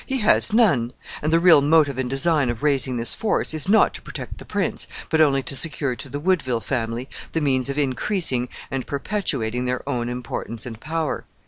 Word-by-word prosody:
He 265 - 0
has 210 - +4
none, 170 - +3 0.3
and 155 - 0
the 165 - +5
real 170 -4 +7
motive 145 -2 +3
and 130 -1 -1
design 140 0 +2
of 120 +3 -4
raising 135 -4 +1
this 115 0 -2
force 220 -6 0
is 155 +3 -2
not 220 - +5
to - - -7
protect - - -7
the - - -10
prince, - - -2 0.2
but 160 -1 +3
only 135 -3 +3
to 140 - -3
secure 140 -3 0
to 140 - -8
the 145 +2 -4
Woodville 150 -8 +1
family 120 0 -3 0.3
the 165 - +1
means 135 -3 +1
of 140 - -3
increasing 135 - 0 0.2
and 135 -2 -3
perpetuating 125 - -2
their 125 +1 -3
own 120 -3 -2
importance 115 -2 -4
and 115 -3 -7
power." 160 +1 -3
140 Hz, 200 wpm, -23 LUFS, 125-160 Hz, 0.3 s, real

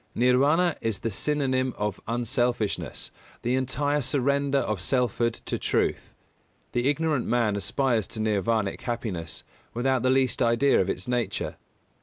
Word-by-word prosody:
Nirvāna 140 +8 +3
is 115 -3 0
the 115 - -3
synonym 130 +1 0
of 105 -2 -2
unselfishness, 120 -1 -1 0.3
the 120 - +1
entire 140 +3 0
surrender 140 +1 +1
of 105 -8 -1
selfhood 120 0 +1
to - - -2
truth. - - -1 0.6
The 120 +3 +1
ignorant 150 -2 0
man 115 -3 +2
aspires 115 +1 0
to 110 - -5
nirvānic 110 -1 0
happiness 100 - -4 0.3
without 130 +1 +1
the 130 - +2
least 130 -1 +2
idea 120 +4 +4
of 95 - -1
its 90 - -3
nature. 125 -1 -1
120 Hz, 135 wpm, -26 LUFS, 110-135 Hz, 0.6 s, idea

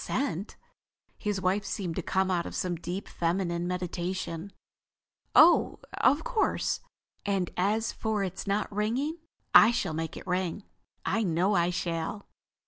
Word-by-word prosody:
"Sent?" 220 - -2 0.6
His 205 -2 -1
wife 190 +2 +1
seemed 180 -4 -3
to - - -1
come 190 +2 +1
out 175 -2 0
of - - -7
some 180 -1 -1
deep 175 +4 -5
feminine 170 0 -1
meditation. 180 0 -3 0.8
"Oh, 345 +2 +6 0.2
of 280 +4 +3
course. - - 0 0.4
And 195 -3 0
as 210 +5 +1
for 215 -2 -1
its 190 0 -5
not 200 +2 0
ringing—I 255 +4 +3
shall 195 -8 -1
make 160 +1 -3
it - - -9
ring. 185 +1 -1 0.4
I 220 +4 +1
know 185 +1 +2
I 175 -2 +3
shall." 175 +3 -3
190 Hz, 135 wpm, -29 LUFS, 175-210 Hz, 0.8 s, Oh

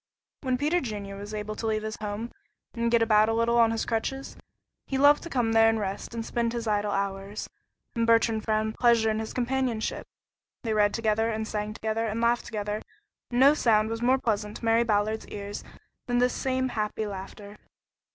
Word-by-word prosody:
When 255 -2 0
Peter 305 +6 +1
Junior 205 -5 -5
was 205 +1 -8
able 215 0 -4
to 225 +1 -4
leave 215 -1 0
his 215 0 -4
home 215 +3 -4 0.4
and 235 -1 0
get 235 -1 +4
about 215 -1 +4
a 225 - +1
little 235 +1 +2
on 230 -1 +6
his 225 0 -1
crutches, 270 +4 -3 0.5
he 270 - -1
loved 285 +2 +6
to 335 - -8
come 245 -6 +1
there 225 0 +6
and 225 - +1
rest 200 +3 -4
and 225 -1 -3
spend 235 0 -1
his 235 -1 -3
idle 210 -1 0
hours, 195 +1 -3 0.5
and 230 0 +1
Bertrand 230 -1 +3
found 220 0 0
pleasure 230 -2 +3
in 215 - -1
his 220 - -4
companionship. 250 -2 -1 0.6
They 225 -2 -1
read 205 -1 +3
together, 225 0 +1
and 220 -1 -2
sang 210 0 -3
together, 220 +1 -1
and 220 +1 -2
laughed 235 +1 +1
together, 210 -1 -3 0.5
and 245 - -1
no 275 +3 +7
sound 220 -6 +2
was 225 0 -3
more 255 +2 +4
pleasant 210 -4 -2
to - - -8
Mary 225 +1 +4
Ballard's 215 0 0
ears 205 0 -6 0.4
than 245 0 +1
this 250 0 +3
same 260 -1 -1
happy 215 -1 -2
laughter. 200 +1 -8
225 Hz, 200 wpm, -27 LUFS, 210-235 Hz, 0.6 s, no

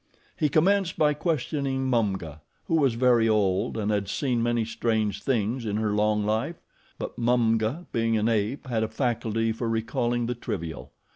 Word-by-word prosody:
He 150 - +1
commenced 185 +5 +2
by 150 -1 +3
questioning 140 -4 -1
Mumga, 95 - -1 0.2
who - - -3
was 135 -6 +2
very 120 -2 +4
old 100 -2 +1
and 105 -1 0
had 100 -2 0
seen 120 +3 0
many 120 -1 +1
strange 110 -2 -1
things 120 -1 0
in 105 -2 -2
her 110 -1 0
long 105 0 +1
life; 115 +10 -1 0.4
but - - -6
Mumga, 120 +5 +1
being 115 -1 +1
an 110 +1 +1
ape, 115 +4 0
had 120 -4 -1
a 110 - +1
faculty 115 -1 -1
for 115 +1 -3
recalling 120 +1 0
the 120 - -1
trivial. 85 - -5
115 Hz, 165 wpm, -26 LUFS, 110-130 Hz, 0.4 s, very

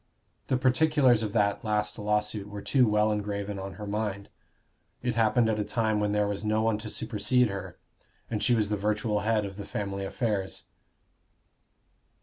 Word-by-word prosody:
The 130 - +2
particulars 130 -2 +3
of 110 -2 -2
that 100 -2 +1
last 105 0 -1
lawsuit 105 0 -1
were 105 0 -7
too 130 -3 +3
well 105 0 +3
engraven 100 -1 -3
on 95 0 -6
her 105 - -7
mind: 100 -1 -3 0.7
it 125 -1 0
happened 115 +1 +3
at 110 -1 0
a - - +1
time 110 -1 0
when 105 0 0
there 105 0 +2
was 100 0 -3
no 110 +1 +1
one 110 -1 +1
to 110 0 -6
supersede 120 +4 +1
her, 100 0 -6 0.5
and 110 -2 -3
she 120 - +3
was 105 -2 +1
the 105 - +1
virtual 105 +1 0
head 105 0 +1
of 100 -1 -7
the 100 - -5
family 100 -1 -4
affairs. 100 -1 -2
105 Hz, 175 wpm, -28 LUFS, 105-115 Hz, 0.7 s, particulars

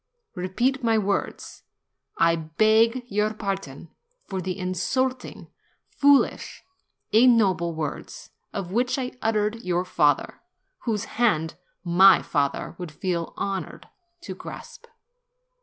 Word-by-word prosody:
Repeat 235 +8 -1
my 225 -1 +3
words. 200 -1 -3 0.6
T 165 0 +4
beg 220 +9 +2
your 210 -1 -1
pardon 195 -8 -5 0.3
for 190 -1 -4
the 185 +1 -4
insulting, 250 +8 -2 0.4
foolish, 285 -1 +2 0.5
and 220 - +6
ig 255 - +7
noble 185 -8 +2
words 155 -2 -6 0.2
which 210 +8 -1
I 255 -2 -3
uttered 215 -1 +1
against 225 - -13
your 180 0 0
father, 150 -5 +1 0.4
whose 220 -3 -1
hand 180 -12 0 0.3
my 185 +3 +6
father 140 -2 -1
would 175 -3 -6
feel 170 +1 -3
honored 195 -1 -4 0.3
to - - -7
grasp.' 475 - -11
195 Hz, 115 wpm, -25 LUFS, 175-230 Hz, 0.6 s, ig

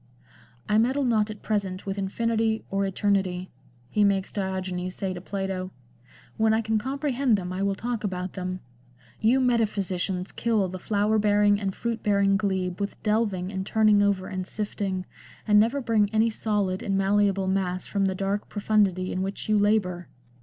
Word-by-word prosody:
" - - -25 0.2
I 210 +1 +3
meddle 260 +5 +2
not 220 -4 +2
at 210 -1 -8
present 200 -3 -2
with 195 0 -3
infinity 225 +2 0
or 195 0 +1
eternity," 190 -2 0 0.4
he 210 +10 +1
makes 195 -1 +1
Diogenes 185 -2 -3
say 190 -2 -2
to 180 - -7
Plato; 190 -1 -3 0.3
" 125 - -26
when 220 0 +3
I 225 - +2
can 220 0 0
comprehend 265 -1 0
them 180 -1 -4
I 185 - -3
will 200 0 +1
talk 235 +1 -3
about 185 -2 -3
them. 185 -1 -4 0.6
You 235 +5 +3
metaphysicians 200 -7 0
kill 220 -4 +1
the 185 +1 -6
flower 210 +2 +1
bearing 205 0 +3
and 195 -1 -1
fruit 235 -1 -3
bearing 200 -1 +3
glebe 190 -3 -1
with 200 0 -3
delving 210 -4 0
and 190 -1 -3
turning 215 0 +4
over 200 -2 +1
and 185 -1 -4
sifting, 195 -3 -3 0.4
and 210 -1 +6
never 235 +6 +2
bring 220 -4 +2
any 220 +1 +3
solid 205 -4 -1
and 195 -1 0
malleable 195 0 +2
mass 185 -1 -1
from 200 -1 0
the 190 -1 0
dark 195 +2 -2
profundity 200 -3 +1
in 185 - -2
which 195 +1 -4
you 215 - +3
labour. 205 -4 +1
200 Hz, 175 wpm, -26 LUFS, 190-215 Hz, 0.6 s, and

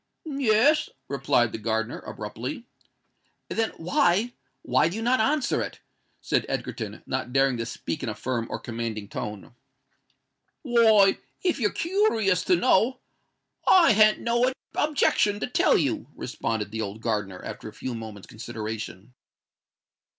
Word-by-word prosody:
"Yes," 275 0 +3 0.2
replied 135 -4 +1
the - - -5
gardener, 110 +1 -2
abruptly. 115 - -6 0.8
"Then, 225 -1 0
why—why 160 - +1
do 175 - -6
you 225 - -3
not 250 +2 +3
answer 275 +4 +1
it?" - - -5 0.4
said - - +1
Egerton, - - -4
not 125 - -3
daring 135 0 +3
to 115 0 -3
speak - - -5
in - - -3
a - - -4
firm 120 -3 -2
or - - -3
commanding 115 -3 -5
tone. 105 +1 -6 1.1
"Why—if 230 - +3
you're 210 -4 +2
koorious 230 - +1
to 180 - +4
know, 220 +8 +3 0.7
I 360 -6 +7
han't 215 0 +5
no 240 +2 +2 0.2
objection 210 -8 +2
to - - -1
tell 250 - +3
you," 140 -6 -1
responded 110 -4 -3
the 110 +1 -3
old 105 +1 -5
gardener, 105 -5 -2
after - - -7
a - - -14
few 130 - -5
moments' 110 -3 -8
consideration. 110 -1 -7
140 Hz, 135 wpm, -26 LUFS, -, 1.1 s, I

